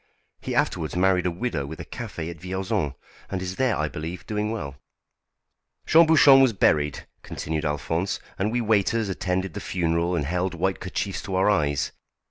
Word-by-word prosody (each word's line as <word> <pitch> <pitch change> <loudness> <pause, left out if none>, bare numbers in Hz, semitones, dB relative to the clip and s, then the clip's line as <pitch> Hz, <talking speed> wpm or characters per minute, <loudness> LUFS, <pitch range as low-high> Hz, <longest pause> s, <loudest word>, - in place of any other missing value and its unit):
He - - -4
afterwards 80 +1 0
married 90 0 +3
a - - +2
widow 85 - -3
with 80 +2 -8
a - - -6
café 80 0 -6
at 85 - -11
Vierzon, 90 -6 -2 0.3
and 95 - -2
is 95 0 -5
there, 130 -3 +2
I 75 - 0
believe, 80 +4 -6
doing 105 0 -2
well. 70 -11 -5 1.1
"Jean 165 +1 +6
Bouchon 145 -4 +7
was 130 -4 +4
buried," 75 -6 +1 0.2
continued 80 0 -4
Alphonse; 80 +6 -1 0.2
"and 105 +3 0
we 120 +1 0
waiters 110 0 +1
attended 90 -1 -2
the - - -5
funeral 85 0 0
and 75 - -1
held 90 +3 -1
white 95 +2 -1
kerchiefs 95 +1 -3
to 95 - -4
our 95 +3 +4
eyes. 75 -8 0
90 Hz, 175 wpm, -25 LUFS, 80-100 Hz, 1.1 s, Bouchon